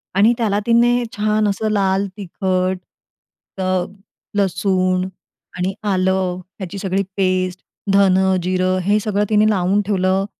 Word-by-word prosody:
आणि 215 +5 +5
त्याला 210 -3 +1
तिने 240 +1 +3
छान 215 0 +1
असं 215 +2 -1
लाल 195 -1 +1
तिखट, 185 -1 -1 0.8
अ, 185 -1 +1 0.5
लसूण, 185 -1 +1 0.5
आणि 185 +2 -1 0.2
आलं, 185 -1 0 0.2
ह्याची 190 +1 -6
सगळी 195 0 -1
पेस्ट, 185 -1 0 0.3
धन, 195 -2 +5 0.3
जिरं 185 0 +1
हे 205 +3 +2
सगळं 205 -1 0
तिने 215 0 +4
लावून 195 0 +2
ठेवलं, 190 -1 +1
190 Hz, 120 wpm, -19 LUFS, 185-205 Hz, 0.8 s, आणि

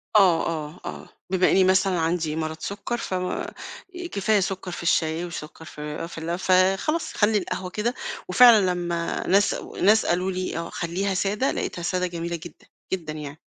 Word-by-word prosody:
آه، 185 -5 +5
آه، 155 +1 -4
آه، - - -7 0.2
بِما 185 -1 +3
إني 190 - +5
مثلًا 185 -1 +3
عندي 160 -1 0
مرض 160 0 -3
سُكّر 205 +4 -4
فما 185 -5 -3 0.6
كفاية 205 +1 +2
سُكّر 190 -1 -3
في 175 - -6
الشاي 165 0 +1
وسُكّر 160 -2 -8
في 150 +1 -6
في 170 - -11
ال 170 +2 -3
فخلاص 190 - +2
خلّي 210 0 +3
القهوة 185 -1 -3
كده، 215 +6 -1 0.4
وفعلًا 210 -1 +7
لمّا 175 -1 -2
ناس 200 +2 +4 0.3
ناس 215 +3 +5
قالوا 180 +2 +1
لي 185 -2 -3
آه 170 0 -4
خلّيها 185 +4 -2
سادة 205 +7 0
لقيتها 175 - -3
سادة 180 +1 0
جميلة 170 0 -4
جدًا، 170 -1 -11 0.3
جدًا 165 -5 -3
يعني، 150 0 -8
180 Hz, 165 wpm, -25 LUFS, 165-195 Hz, 0.6 s, وفعلًا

